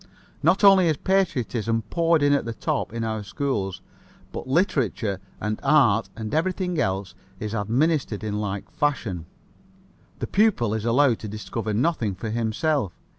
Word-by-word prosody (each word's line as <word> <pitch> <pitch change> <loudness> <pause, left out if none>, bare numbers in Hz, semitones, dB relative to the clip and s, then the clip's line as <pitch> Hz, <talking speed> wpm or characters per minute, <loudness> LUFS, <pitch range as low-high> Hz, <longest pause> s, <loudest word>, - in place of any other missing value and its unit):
Not 195 - +3
only 195 -3 +7
is 155 -3 +1
patriotism 125 - 0
poured 165 -2 +3
in 145 0 +4
at 140 - +2
the 115 0 -5
top - - -2
in 115 0 -3
our 110 -1 -2
schools, 105 -4 -3 0.5
but - - -6
literature 130 - 0 0.2
and 105 +1 -2
art 130 -7 +4
and 110 -1 -5
everything 180 +1 0
else 95 -4 -1 0.3
is 105 0 -4
administered 120 +2 0
in 105 -1 -2
like 100 -2 -4
fashion. 110 - -1 0.9
The - - -3
pupil 200 - +2
is 110 0 -2
allowed 125 0 +3
to 110 - -6
discover 110 +1 -4
nothing 120 - 0
for 110 +4 -5
himself. 115 - 0
115 Hz, 150 wpm, -24 LUFS, 105-155 Hz, 0.9 s, only